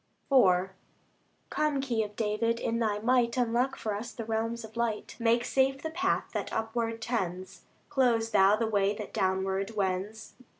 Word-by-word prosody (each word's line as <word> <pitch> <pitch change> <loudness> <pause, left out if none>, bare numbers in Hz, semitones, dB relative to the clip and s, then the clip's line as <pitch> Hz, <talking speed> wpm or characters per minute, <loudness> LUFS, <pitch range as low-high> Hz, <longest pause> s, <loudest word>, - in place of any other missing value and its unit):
IV 190 -8 +5 0.8
Come, 300 -2 +1
Key 245 -5 0
of 210 -1 -5
David! 230 +2 0
in 230 0 -1
Thy 215 -3 +1
might 235 +2 +2
Unlock 245 +2 +1
for 215 - -3
us 225 +4 -5
the 230 - -6
realms 225 +1 -2
of 220 - -14
light; 235 -2 -2
Make 235 +1 +2
safe 270 0 +1
the 320 - -3
path 365 +4 0
that - - -3
upward 225 0 -2
tends, 185 -6 -3 0.2
Close 235 -4 +2
Thou 200 -1 +5
the 225 +1 0
way 205 -2 +1
that 210 0 -7
downward 190 +1 -1
wends. 200 +2 -2
225 Hz, 165 wpm, -29 LUFS, 205-240 Hz, 0.8 s, IV